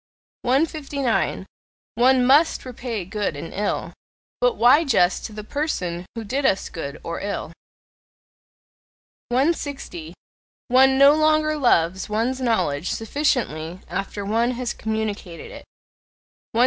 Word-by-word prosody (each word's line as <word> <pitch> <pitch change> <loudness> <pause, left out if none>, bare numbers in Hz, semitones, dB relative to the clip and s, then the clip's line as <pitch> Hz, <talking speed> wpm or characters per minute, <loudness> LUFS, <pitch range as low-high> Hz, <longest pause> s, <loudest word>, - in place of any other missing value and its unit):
159. 275 -5 0 0.5
One 250 +2 +4
MUST 290 +5 +4
repay 240 -5 -5
good 205 -3 -2
and 155 +3 -7
ill; 205 +1 -2 0.5
but - - +2
why 255 +7 +5
just 190 - +2
to - - -6
the 210 0 -7
person 185 - -3
who 230 - -4
did 265 +7 -2
us 195 -8 +1
good 140 -3 -6
or 170 - -4
ill? 200 -5 -4 1.8
160. 260 - -2 0.5
One 265 +1 +5
no 280 +1 +8
longer 310 0 +2
loves 190 - +2
one's 235 +5 -1
knowledge 185 - 0
sufficiently 215 - -1
after 195 +2 -4
one 230 +4 +1
has 250 -1 -2
communicated 215 -5 -4
it. - - -11 0.9
161. 225 - 0
235 Hz, 120 wpm, -23 LUFS, 190-275 Hz, 1.8 s, no